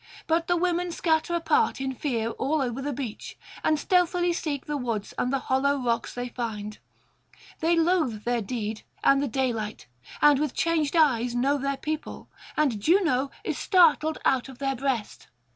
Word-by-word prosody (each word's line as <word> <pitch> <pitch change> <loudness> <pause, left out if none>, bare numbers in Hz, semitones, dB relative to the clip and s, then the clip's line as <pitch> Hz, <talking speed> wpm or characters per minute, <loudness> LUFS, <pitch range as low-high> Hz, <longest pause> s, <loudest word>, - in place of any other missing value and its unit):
But 330 0 +1
the 350 - +2
women 355 0 0
scatter 330 0 +1
apart 390 +5 +1
in 265 0 -2
fear 235 -4 -2
all 285 +6 -1
over 255 -1 -2
the 290 +2 -2
beach, 255 -5 -6 0.3
and 310 - +3
stealthily 355 +1 +2
seek 295 -5 -3
the 295 - -3
woods 230 -6 -3
and 250 - -1
the 275 - +2
hollow 280 +2 +2
rocks 235 -3 -1
they 245 0 -4
find: 215 -3 -5 0.8
they 335 +1 +2
loathe 325 - +1
their 240 -1 0
deed 215 0 -4 0.2
and 275 0 +5
the 285 - 0
daylight, 230 -4 -2 0.3
and 295 -2 +5
with 300 -3 -1
changed 330 -2 +1
eyes 250 -7 +3
know 275 +4 +2
their 275 0 -1
people, 310 +1 -5 0.3
and 275 -8 +2
Juno 310 - +2
is - - -3
startled 320 -4 +4
out 265 0 +2
of 265 - -11
their 270 0 -1
breast. 255 -4 -3
275 Hz, 170 wpm, -26 LUFS, 245-320 Hz, 0.8 s, and